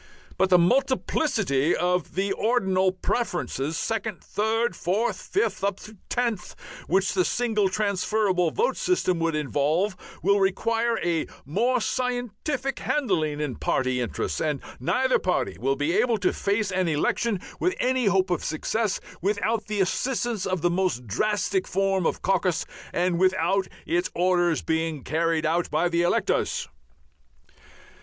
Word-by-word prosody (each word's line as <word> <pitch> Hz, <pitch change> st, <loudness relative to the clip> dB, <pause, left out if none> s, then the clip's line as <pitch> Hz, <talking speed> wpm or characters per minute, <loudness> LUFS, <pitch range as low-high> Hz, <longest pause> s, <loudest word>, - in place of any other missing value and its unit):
But 190 Hz, -, +2 dB
the 180 Hz, -, +7 dB
multiplicity 220 Hz, -, +2 dB
of 180 Hz, -1 st, -1 dB, 0.2 s
ordinal 190 Hz, -5 st, +2 dB
preferences, 175 Hz, -, -2 dB
second, 220 Hz, -1 st, -3 dB
third, 225 Hz, +3 st, 0 dB
fourth, 205 Hz, +7 st, -1 dB
fifth, 400 Hz, -, -1 dB
up 200 Hz, -1 st, 0 dB
to 215 Hz, +1 st, -11 dB
tenth, 235 Hz, -6 st, -1 dB, 0.3 s
which 190 Hz, +1 st, +2 dB
the 185 Hz, -1 st, +3 dB
single 215 Hz, -2 st, +1 dB
transferable 200 Hz, -2 st, +1 dB
vote 475 Hz, -, 0 dB
system 185 Hz, -, +1 dB
would 165 Hz, -1 st, 0 dB
involve, 155 Hz, +6 st, 0 dB, 0.3 s
will 200 Hz, +2 st, +4 dB
require 230 Hz, +4 st, +1 dB
a 170 Hz, -2 st, 0 dB, 0.2 s
more 245 Hz, -, +1 dB
scientific 250 Hz, +3 st, -2 dB
handling 155 Hz, -, 0 dB
in 145 Hz, -6 st, -3 dB
party 130 Hz, -1 st, 0 dB
interests, 120 Hz, -, -2 dB
and 150 Hz, -3 st, 0 dB, 0.2 s
neither 255 Hz, -, +2 dB
party 180 Hz, 0 st, -1 dB
will 135 Hz, +2 st, +1 dB
be 145 Hz, +4 st, 0 dB
able 235 Hz, +3 st, +2 dB
to 190 Hz, -2 st, +1 dB
face 200 Hz, 0 st, 0 dB
an 185 Hz, -1 st, +1 dB
election 185 Hz, +7 st, 0 dB, 0.2 s
with 365 Hz, +1 st, +1 dB
any 255 Hz, -1 st, +1 dB
hope 190 Hz, -1 st, +2 dB
of 175 Hz, -, 0 dB
success 205 Hz, +6 st, -1 dB, 0.2 s
without 210 Hz, +3 st, 0 dB
the 210 Hz, -2 st, 0 dB
assistance 235 Hz, +1 st, -1 dB
of 185 Hz, -3 st, -1 dB
the 175 Hz, -, +2 dB
most 175 Hz, -9 st, 0 dB
drastic 190 Hz, -, 0 dB
form 195 Hz, -2 st, +1 dB
of -, -, -3 dB
caucus 180 Hz, -3 st, +1 dB, 0.3 s
and 175 Hz, 0 st, +1 dB
without 185 Hz, +1 st, +2 dB, 0.2 s
its 175 Hz, +1 st, 0 dB
orders 175 Hz, -2 st, +2 dB
being 160 Hz, -3 st, -1 dB
carried 165 Hz, +1 st, 0 dB
out 165 Hz, +3 st, +1 dB
by 155 Hz, +3 st, +1 dB
the 170 Hz, 0 st, +1 dB
electors." 175 Hz, -, +1 dB
190 Hz, 140 wpm, -25 LUFS, 170-220 Hz, 0.3 s, the